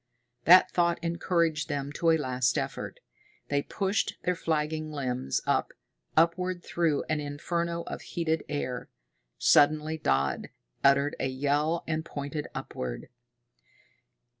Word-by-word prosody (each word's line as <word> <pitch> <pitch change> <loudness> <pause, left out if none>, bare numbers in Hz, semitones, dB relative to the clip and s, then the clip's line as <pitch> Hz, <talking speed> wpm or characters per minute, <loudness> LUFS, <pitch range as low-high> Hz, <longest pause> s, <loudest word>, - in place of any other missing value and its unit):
That 180 +3 +8
thought 170 -1 +2
encouraged 170 -2 0
them 140 -1 -2
to 165 +3 +1
a 160 - +5
last 130 -3 0
effort. - - -4 0.5
They 140 0 +2
pushed 195 +6 -1
their 180 - +2
flagging 155 -2 -1
limbs 125 - -2
up, - - +1 0.4
upward 175 +2 +2
through 165 -4 0
an 155 -1 -1
inferno 170 +4 -2
of - - -6
heated 160 -2 -1
air. 130 -4 -3 0.5
Suddenly 155 +2 +4
Dodd 70 - 0 0.3
uttered 140 +1 +4
a - - 0
yell 145 +5 0
and 160 0 -1
pointed 145 -1 -5
upward. - - -5
155 Hz, 120 wpm, -28 LUFS, 140-170 Hz, 0.5 s, That